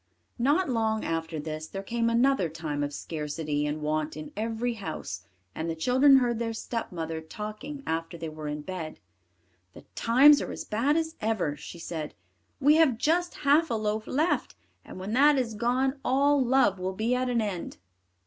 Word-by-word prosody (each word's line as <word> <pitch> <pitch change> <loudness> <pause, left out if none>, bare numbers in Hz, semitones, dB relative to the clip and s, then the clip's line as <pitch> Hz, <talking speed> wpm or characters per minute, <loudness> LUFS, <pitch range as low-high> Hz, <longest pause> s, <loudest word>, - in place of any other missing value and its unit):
Not 290 +9 +3
long 220 -3 0
after 165 -1 -2
this 155 +1 -5
there 195 +3 -6
came 230 +3 0
another 235 -6 +3
time 155 -2 -4
of 145 - -2
scarcity 150 -1 -3
and 150 +1 -3
want 155 0 -1
in 155 - -7
every 225 +3 -1
house, 195 - -6 0.3
and 160 +1 -3
the 165 - -2
children 260 - +5
heard 240 -3 +1
their 230 -1 -2
stepmother 165 -9 -4
talking 215 - -7
after 165 +1 -3
they 165 - -5
were 155 -1 -7
in 150 0 -4
bed. 165 -3 -6 0.7
"The - - -13
times 275 +5 +6
are - - -4
as - - -6
bad 265 +9 +1
as 320 0 -2
ever," 210 -9 0
she 170 - -10
said; 160 -2 -5 0.4
"we 295 +3 +5
have 295 -8 +4
just 345 +7 +1
half 300 +4 +4
a 230 - 0
loaf 215 0 -2
left, 310 +6 0 0.3
and - - -10
when 195 +3 -4
that 285 +3 +5
is 240 -4 -1
gone 255 +5 0
all 280 +1 +3
love 245 -6 +3
will 185 +1 -2
be 220 +5 0
at 250 0 0
an 240 -1 +1
end. 200 -6 -3
220 Hz, 180 wpm, -28 LUFS, 160-260 Hz, 0.7 s, times